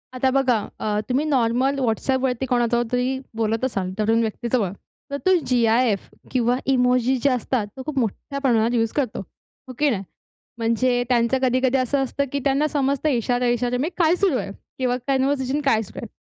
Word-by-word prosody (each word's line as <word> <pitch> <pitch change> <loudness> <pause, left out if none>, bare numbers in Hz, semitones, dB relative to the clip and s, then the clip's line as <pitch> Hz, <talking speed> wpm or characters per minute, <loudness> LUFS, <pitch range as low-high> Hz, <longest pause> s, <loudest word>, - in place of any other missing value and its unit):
आता 260 +1 +2
बघा, 260 -3 +3 0.2
अ 210 -1 -1
तुम्ही 265 +4 +1
नॉर्मल 265 0 +1
WhatsAppवरती 260 +1 0
कोणाजवळतरी 245 +2 +1 0.2
बोलत 225 +1 -1
असाल, 195 -7 -2
तरुण 225 +2 +2
व्यक्ती 225 +1 -3
जवळ, 210 -8 +2 0.4
तर 280 - -1
तो 375 - +5
जी-आय-एफ 230 -3 +2 0.2
किंवा 245 -1 +2 0.2
इमोजी 250 0 +2
ज्या 280 -2 +3
असतात, 240 -2 -1
तो 260 - -6
खूप 305 -3 -5
मोठ्या 245 +5 -3
प्रमाणात 240 -3 +2
यूज 225 -1 +1
करतो, 270 -7 -1 0.5
हो 255 - -8
की 295 0 +3
नाही? 200 -7 -1 0.5
म्हणजे 245 +2 +1
त्यांचं 240 +1 +2
कधी-कधी 255 +1 +2
असं 265 +2 +1
असतं, 280 +2 -2
की 280 - -1
त्यांना 280 +2 +2
समजतं 280 +1 0
इशारो-इशारो 245 -1 0
में 315 - 0
काय 340 -1 +4
सुरू 360 -8 +1
आहे 200 - -4 0.3
किंवा 250 -1 +1
कॉन्व्हर्सेशन 270 +1 +1
काय 225 -5 +3
सुरू 210 - -9
आहे. - - -6
250 Hz, 170 wpm, -22 LUFS, 230-270 Hz, 0.5 s, तो